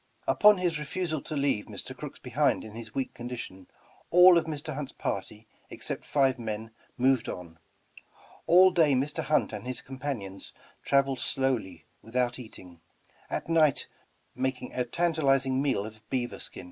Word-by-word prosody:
Upon 210 -1 +6
his 175 -4 0
refusal 155 0 -3
to 155 - -6
leave 140 -7 +1
Mr. - - -8
Crooks - - -8
behind - - +1
in 110 - -9
his 110 0 -10
weak 135 -1 -2
condition, 120 -6 -7 0.4
all 180 +1 +8
of - - -5
Mr. 155 0 -4
Hunt's 140 -1 -5
party, 105 +3 -4 0.2
except - - -6
five 135 -3 +2
men, 110 0 -5 0.3
moved 130 -1 +2
on. 85 -2 -8 0.9
All 185 +2 +7
day 160 -5 +4
Mr. 145 +5 0
Hunt 150 +2 +1
and - - -6
his 130 - -5
companions 130 -8 -6 0.3
traveled 140 -2 +2
slowly 120 -11 -1 0.2
without 120 +2 -1
eating, 90 -8 -12 0.5
at - - -3
night 160 -4 +3 0.5
making 130 -1 -3
a 125 - -1
tan 170 +7 0
talizing 135 -3 +2
meal 135 -8 0
of 110 0 -10
beaver 125 -2 -2
skin. - - -9
130 Hz, 155 wpm, -28 LUFS, 115-150 Hz, 0.9 s, all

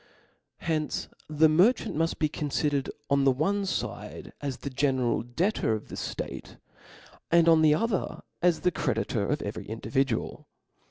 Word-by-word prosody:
Hence 155 -2 -1 0.2
the 155 +1 +5
merchant 180 +11 +3
muft 165 +2 0
be 155 - +2
confidercd 145 -2 -1 0.2
on 140 0 +4
the 135 - +5
one 195 +9 0
fide - - -4
as 140 -3 -3
the 140 - -6
general 130 -3 +1
debtor 120 - 0
of 110 - -5
the - - -6
ftate, - - -6 0.7
and 170 0 +5
on 165 -1 +6
the 150 -1 +5
other 220 +2 -1 0.2
as 175 -1 +3
the 180 - +2
credi 120 -9 -1
tor 100 -3 -1
of 150 - -1
every 100 - -5
individual. 130 +5 -2
150 Hz, 155 wpm, -28 LUFS, 135-165 Hz, 0.7 s, on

